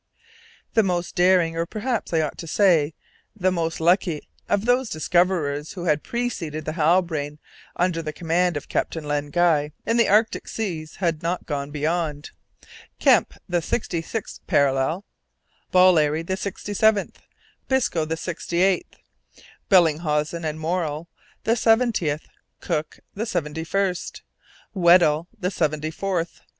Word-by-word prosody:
The 225 - +5
most 180 -3 -1
daring, 180 -2 +3
or, 165 +1 -1
perhaps 230 +4 -3
I 165 -2 +2
ought 150 - -3
to 165 - -6
say, 165 -4 +3 0.4
the 185 -3 +1
most 165 -2 -2
lucky 170 -1 +1 0.2
of 205 +1 +1
those 245 0 +2
discoverers 155 -4 0
who 180 - -6
had 150 -3 +2
preceded 170 -11 -3
the 155 - -2
Halbrane, 160 -3 +1 0.4
under 175 -2 0
the 155 -1 -4
command 170 +1 0
of 145 - -7
Captain 160 - -2
Len 145 0 -2
Guy, 150 -2 +2
in 230 - +1
the 235 - +4
Antarctic 215 +3 +2
seas, 165 -8 -4
had 170 -4 -1
not 175 +2 -2
gone 140 -2 -3
beyond 150 0 -2 0.7
Kemp, - - +3
the 175 -1 0
sixty 170 -2 -2
sixth 215 +6 -5
parallel; 140 +7 +1 0.7
Ballerry, 165 -4 +4
the 190 +3 -2
sixty 200 +2 -5
seventh; 215 0 +2 0.5
Biscoe, 260 -11 +1
the 160 +1 -3
sixty 170 +1 -2
eighth; 190 -1 +1 0.7
Bellinghausen 160 -2 +2
and 155 0 -3
Morrell, 160 -1 -2 0.3
the 225 - +2
seventieth; 225 -10 +2 0.3
Cook, 150 0 -3
the 220 +4 -3
seventy 160 -4 -2
first; 185 +1 -2 0.5
Weddell, 170 -4 +4
the 180 +1 -1
seventy 155 -3 -1
fourth. 175 -1 -3
170 Hz, 140 wpm, -23 LUFS, 155-190 Hz, 0.7 s, The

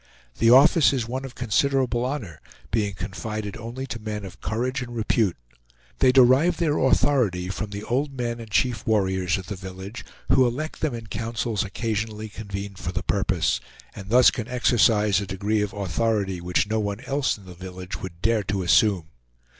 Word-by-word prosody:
The 115 - +5
office 140 +5 +6
is 125 -4 -1
one 130 +3 -4
of 130 -2 -9
considerable 125 +1 +1
honor, 120 - -5 0.3
being 105 -2 0
confided 105 +2 -5
only 120 +4 -6
to 120 -3 -6
men 105 -2 -5
of 95 0 -11
courage 125 +4 -2
and 120 -1 -6
repute. 110 -4 +1 0.6
They 130 - +5
derive 135 +7 +5
their 155 -3 +1
authority 115 -9 +2
from 105 +2 -4
the 100 +1 -6
old 140 +4 -1
men 120 -1 -2
and 115 -1 -9
chief 120 +2 0
warriors 95 -5 +1
of 95 - -7
the 105 - -5
village, 95 +3 -8 0.3
who 130 -2 +5
elect 150 +7 -4
them 150 -6 0
in 115 -1 -7
councils 115 0 -2
occasionally 110 +1 -3
convened 100 -2 -7
for 90 -1 -4
the - - -3
purpose, 90 -9 +1 0.4
and 95 0 -9
thus 125 +2 +7
can 115 -4 -5
exercise 110 -5 +3
a 100 - -5
degree 105 +3 0
of 105 -1 -1
authority 100 0 -1
which 90 +3 +1
no 110 +1 0
one 100 +1 -3
else 135 -1 0
in 100 - -16
the 90 - -10
village 90 +1 -8
would 85 -2 -8
dare 115 0 +3
to 100 -2 -1
assume. 95 -1 +3
110 Hz, 180 wpm, -24 LUFS, 95-125 Hz, 0.6 s, thus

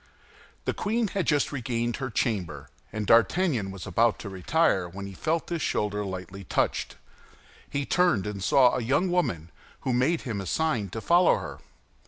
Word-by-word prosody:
The - - 0
queen 220 +1 -1
had 195 -2 -2
just 145 -2 +2
regained 120 -3 -2
her 130 -2 -3
chamber, 90 - -2 0.2
and 110 -1 -3
D'Artagnan 115 - +3
was 95 -2 -7
about 115 -1 +2
to 100 - -7
retire, 95 - +1
when 100 +3 -7
he 100 - -8
felt 160 - -1
his 170 -2 -2
shoulder 105 0 -1
lightly 95 0 -6
touched. - - -1 0.7
He 140 -1 -2
turned 175 - +2
and 100 -2 -4
saw 125 +4 +5
a 125 - -1
young 140 +10 +1
woman, 85 - -1 0.3
who 130 - -1
made 135 +7 +2
him 110 -6 -4
a 95 - -6
sign 120 - 0
to 110 +5 -6
follow 175 +6 +5
her. 70 -3 -7
115 Hz, 175 wpm, -27 LUFS, 95-160 Hz, 0.7 s, saw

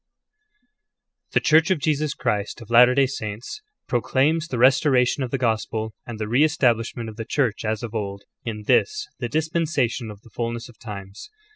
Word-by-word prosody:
The - - +5
Church 160 +2 +4
of 190 - +3
Jesus 150 0 0
Christ 105 -5 -2
of 115 -2 -12
Latter 125 +2 +7
day 140 0 +5
Saints 115 - -6 0.3
pro 120 - +1
claims 155 +7 +1
the 125 - -3
restoration 130 +1 +4
of 130 - -2
the 135 - -1
Gospel, 110 -2 -1
and 120 -2 -6
the 110 -1 -3
re 125 +7 +3
establishment 120 -6 +1
of 110 -1 -9
the 115 - -3
Church 125 -3 0
as 110 +1 -2
of 115 -2 -5
old, 100 -2 -4 0.2
in 105 -2 -5
this, 425 - +2
the - - -3
Dispensation 155 -7 0
of 105 -1 -10
the 115 - -18
Fulness 115 0 -4
of 120 - -17
Times. 100 - -9
120 Hz, 180 wpm, -23 LUFS, 110-140 Hz, 0.3 s, Latter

